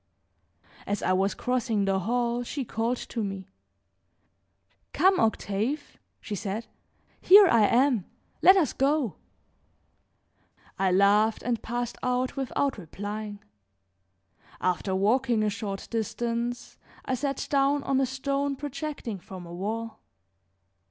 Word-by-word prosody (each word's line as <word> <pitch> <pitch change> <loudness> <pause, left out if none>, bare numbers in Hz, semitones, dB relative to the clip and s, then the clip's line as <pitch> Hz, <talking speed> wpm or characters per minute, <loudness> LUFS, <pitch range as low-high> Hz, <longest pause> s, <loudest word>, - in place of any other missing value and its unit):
As 205 0 -2
I 185 - +2
was 195 +2 +1
crossing 235 -5 0
the 195 -1 +1
hall 240 +4 0
she 265 +2 -4
called 230 +3 -1
to 230 -2 -4
me: 195 -2 -5 1.5
"Come, 380 +1 +4
Octave!" 220 +5 -1 0.2
she 215 - -7
said; 205 +3 -3 0.6
"here 400 +2 +9
I 225 - +5
am, 245 -5 +3 0.4
let 380 +1 +8
us 335 -6 +2
go." 275 - +1 1.6
I 190 -1 +2
laughed 205 +3 +3
and 235 -3 -1
passed 240 +1 -4
out 250 0 0
without 270 -1 -1
replying. 205 +4 -6 1.2
After 185 +1 0
walking 230 +3 +2
a 210 - +1
short 200 -1 -5
distance 235 +2 -3 0.3
I 260 - -1
sat 275 +2 -2
down 280 0 +2
on 270 0 +1
a 265 - +1
stone 275 +2 -1
projecting 280 -6 -5
from 180 0 -10
a 170 - -10
wall. 220 +5 -4
230 Hz, 120 wpm, -27 LUFS, 205-265 Hz, 1.6 s, here